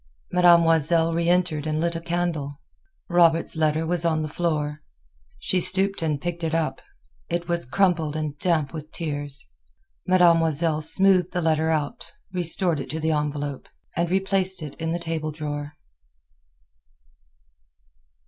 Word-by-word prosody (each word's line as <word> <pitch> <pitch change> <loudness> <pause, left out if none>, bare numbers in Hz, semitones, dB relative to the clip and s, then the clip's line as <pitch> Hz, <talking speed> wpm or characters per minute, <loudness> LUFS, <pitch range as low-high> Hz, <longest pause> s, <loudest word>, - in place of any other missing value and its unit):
Mademoiselle 165 -2 +5
reentered 170 -2 0
and 155 0 -1
lit 170 +1 -1
a 165 - -4
candle. 165 -4 -3 0.5
Robert's 170 -2 +3
letter 155 0 0
was 175 0 -1
on 160 -2 0
the - - -3
floor. 150 -2 -2 0.6
She 185 - 0
stooped 195 +2 +2
and 155 -3 -1
picked 175 +2 -5
it 160 0 -1
up. 155 -5 -2 0.5
It 170 0 -3
was 170 -6 -1
crumpled 165 -1 +1
and 155 -2 -3
damp 160 -5 0
with 155 -1 -8
tears. 145 -3 -3 0.6
Mademoiselle 165 -3 +3
smoothed 185 +3 +3
the 180 - -1
letter 160 0 +1
out, 150 -3 -3 0.2
restored 175 -2 0
it - - -7
to 160 - -4
the 160 0 0
envelope, 145 -2 -3 0.3
and 170 0 -1
replaced 190 -1 +1
it 145 -2 -7
in 160 0 -2
the 170 - -1
table 160 -2 -4
drawer. 145 -1 -6
165 Hz, 140 wpm, -24 LUFS, 155-175 Hz, 0.6 s, Mademoiselle